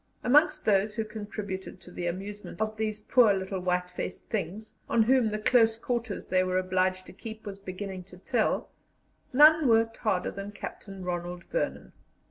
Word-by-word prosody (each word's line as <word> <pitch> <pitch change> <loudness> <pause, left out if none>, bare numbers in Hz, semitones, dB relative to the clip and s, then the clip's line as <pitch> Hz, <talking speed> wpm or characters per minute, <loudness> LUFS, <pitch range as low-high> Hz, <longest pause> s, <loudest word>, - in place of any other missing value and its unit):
Amongst 295 +6 +4
those 210 0 +2
who 220 -1 -1
contributed 205 -3 -6
to - - -13
the 175 - -4
amusement 200 +5 -6
of 215 0 -1
these 215 -1 -2
poor 220 -2 +5
little 190 0 -3
white 180 0 -1
faced 180 - -6
things, 210 +1 -4 0.2
on 230 - +4
whom 250 -1 +3
the 215 - -2
close 225 0 +4
quarters 235 -2 -3
they 185 0 +2
were 185 0 0
obliged 185 0 0
to - - -12
keep 220 -1 -9
was 195 -1 -7
beginning 190 -1 -6
to 180 -1 -14
tell, 225 +4 0 0.6
none 305 +2 +7
worked 225 -1 +3
harder 195 -6 0
than 200 +1 -7
Captain 195 -2 -8
Ronald 175 0 -4
Vernon. - - -2
205 Hz, 170 wpm, -28 LUFS, 185-225 Hz, 0.6 s, none